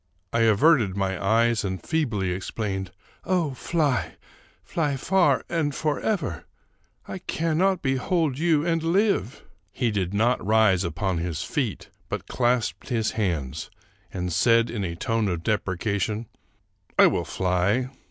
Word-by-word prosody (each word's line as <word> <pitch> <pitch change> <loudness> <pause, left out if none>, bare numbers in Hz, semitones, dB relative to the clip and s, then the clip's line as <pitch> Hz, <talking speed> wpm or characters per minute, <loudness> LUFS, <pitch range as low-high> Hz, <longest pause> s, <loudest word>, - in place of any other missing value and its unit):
I 115 - +2
averted 115 - +4
my 95 -1 -1
eyes 115 +3 +3
and 95 -2 -3
feebly 115 - -1
exclaimed, 95 +1 -3 0.2
" - - -29
Oh, 175 -5 0
fly! 145 -1 -1 0.2
— - - -31
fly 150 -4 -1
far 190 +6 +2
and 155 -4 -1
forever! 155 - -1 0.3
— - - -43 0.3
I 190 - -6
cannot 175 +2 0
behold 135 +2 0
you 160 -2 +2
and 165 -1 +1
live! 170 - +1
" - - -42
He 120 -4 0
did 95 -4 -1
not 115 +5 +1
rise 105 -3 +3
upon 90 +1 -1
his 85 -1 -3
feet, 120 0 -3 0.2
but - - -4
clasped 120 -6 0
his 115 -4 0
hands, 85 - -2 0.4
and 90 -2 -3
said, 115 +5 +3
in 105 -4 -3
a 85 -2 -3
tone 115 +4 0
of 85 -3 -2
deprecation, 105 +2 -1 0.4
" - - -38
I - - +8
will - - +2
fly. 95 +8 0
115 Hz, 150 wpm, -25 LUFS, 95-150 Hz, 0.4 s, I